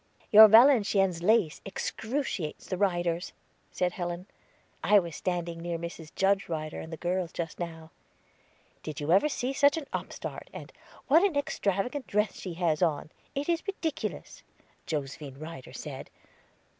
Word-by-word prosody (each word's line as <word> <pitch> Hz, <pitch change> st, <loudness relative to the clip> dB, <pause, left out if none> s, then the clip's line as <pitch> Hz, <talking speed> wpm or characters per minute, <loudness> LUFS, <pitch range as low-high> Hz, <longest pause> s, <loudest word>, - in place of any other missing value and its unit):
"Your 220 Hz, +1 st, +11 dB
Valenciennes 210 Hz, -6 st, +5 dB
lace 200 Hz, -4 st, +2 dB
excruciates 220 Hz, -, -3 dB
the 185 Hz, -, -3 dB
Ryders," 175 Hz, -3 st, 0 dB, 0.4 s
said 180 Hz, -1 st, 0 dB
Helen. 175 Hz, 0 st, -4 dB, 0.6 s
"I 210 Hz, -, +6 dB
was 170 Hz, -5 st, 0 dB
standing 175 Hz, -2 st, -3 dB
near 170 Hz, 0 st, -3 dB
Mrs. 165 Hz, -1 st, -7 dB
Judge 195 Hz, 0 st, +2 dB
Ryder 155 Hz, -2 st, -4 dB
and 160 Hz, -, -8 dB
the 160 Hz, -, -5 dB
girls 180 Hz, 0 st, -2 dB
just 165 Hz, -2 st, -5 dB
now. 165 Hz, -2 st, -6 dB, 0.9 s
'Did 155 Hz, -3 st, -6 dB
you 145 Hz, +2 st, -1 dB
ever 200 Hz, +11 st, +5 dB
see 265 Hz, -2 st, -2 dB
such 285 Hz, +2 st, +4 dB
an 315 Hz, -, -4 dB
upstart?' -, -, -5 dB
And, -, -, -10 dB, 0.3 s
'What 320 Hz, +6 st, +6 dB
an 390 Hz, -6 st, +2 dB
extravagant 245 Hz, -1 st, -1 dB
dress 210 Hz, +2 st, 0 dB
she 180 Hz, -3 st, -6 dB
has 165 Hz, -3 st, 0 dB
on 155 Hz, -3 st, 0 dB, 0.2 s
it 280 Hz, +1 st, -2 dB
is 335 Hz, -1 st, +1 dB
ridiculous,' 320 Hz, -6 st, -4 dB, 0.5 s
Josephine 140 Hz, -2 st, -4 dB
Ryder 155 Hz, -3 st, -9 dB
said. -, -, -7 dB
180 Hz, 145 wpm, -29 LUFS, 165-220 Hz, 0.9 s, Your